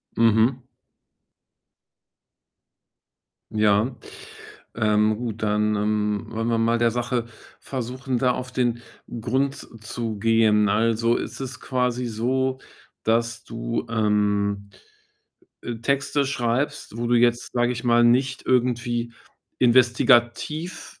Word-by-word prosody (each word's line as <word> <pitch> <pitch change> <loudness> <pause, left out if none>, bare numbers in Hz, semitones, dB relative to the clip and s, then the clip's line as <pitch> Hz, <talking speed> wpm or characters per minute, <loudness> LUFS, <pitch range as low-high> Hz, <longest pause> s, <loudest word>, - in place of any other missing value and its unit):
Mhm. 115 +3 +2 2.8
Ja. 105 +3 +2 0.8
Ähm, 105 -1 +2
gut, 115 -2 -5
dann, 105 0 +1
ähm, 105 +1 -1
wollen 115 0 -3
wir 115 -1 +1
mal 115 +1 +2
der 115 0 +2
Sache 120 0 -2 0.3
versuchen, 130 0 -4
da 125 0 +2
auf 130 +1 -5
den 120 -2 0 0.4
Grund 135 +4 0 0.3
zu 115 -2 -4
gehen. 110 -1 +3
Also, 115 +2 +2
ist - - -5
es 130 -1 -6
quasi 125 -1 -1
so, 130 +3 -1 0.4
dass 115 +1 0
du, 115 0 -4
ähm, 105 -2 0 0.9
äh, 120 -1 -5
Texte 140 +4 0
schreibst, 130 0 -2
wo 120 0 -2
du 120 - +2
jetzt, 120 0 +2
sage 120 0 +1
ich 125 - -6
mal, 120 0 +4
nicht 130 +2 +2
irgendwie 120 -2 0 0.5
investigativ 125 +6 +2
120 Hz, 110 wpm, -23 LUFS, 110-125 Hz, 2.8 s, mal